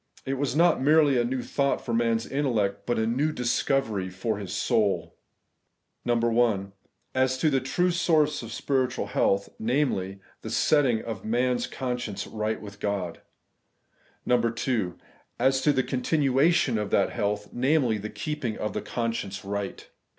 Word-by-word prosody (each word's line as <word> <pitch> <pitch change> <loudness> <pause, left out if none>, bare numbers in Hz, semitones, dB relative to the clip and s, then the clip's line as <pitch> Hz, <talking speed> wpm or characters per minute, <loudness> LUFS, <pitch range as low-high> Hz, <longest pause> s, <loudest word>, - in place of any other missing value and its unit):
It 135 - -1
was 135 -1 -1
not 170 -3 +4
merely 145 -2 +4
a - - +3
new 125 +1 -2
thought 140 +3 0
for 120 - -2
man's 115 -1 +1
intellect, 120 -8 -1
but 120 - +1
a 110 - +1
new 135 +7 +1
dis 125 -4 0
covery 110 -9 0
for 100 +3 -2
his 100 -3 -6
soul, 105 -3 0 0.9
(1) 115 -4 +2 0.4
As 130 0 +2
to 155 +3 +2
the 135 - +3
true 130 +8 +1
source 155 -4 +2
of 115 -1 -8
spiritual 130 +1 -1
health, 100 0 +1
viz. 110 -6 0 0.3
the - - -6
setting 135 -7 +2
of 110 -4 -5
a - - -7
man's 125 +2 +1
con 125 -2 -3
science 105 -4 -4
right 110 0 -2
with 100 -1 -10
God; 100 -5 -3 1.1
(2) 115 -5 0 0.4
As 130 +2 +2
to 150 - +4
the 130 -2 +1
continuation 135 -1 +2
of 105 -1 -3
that - - +2
health, 105 0 -2
viz. 125 -4 +2
the 105 - -5
keeping 120 +1 -4
of 105 -2 -3
the - - -2
conscience 115 -5 -3
right. 100 0 -4
120 Hz, 160 wpm, -26 LUFS, 105-135 Hz, 1.1 s, not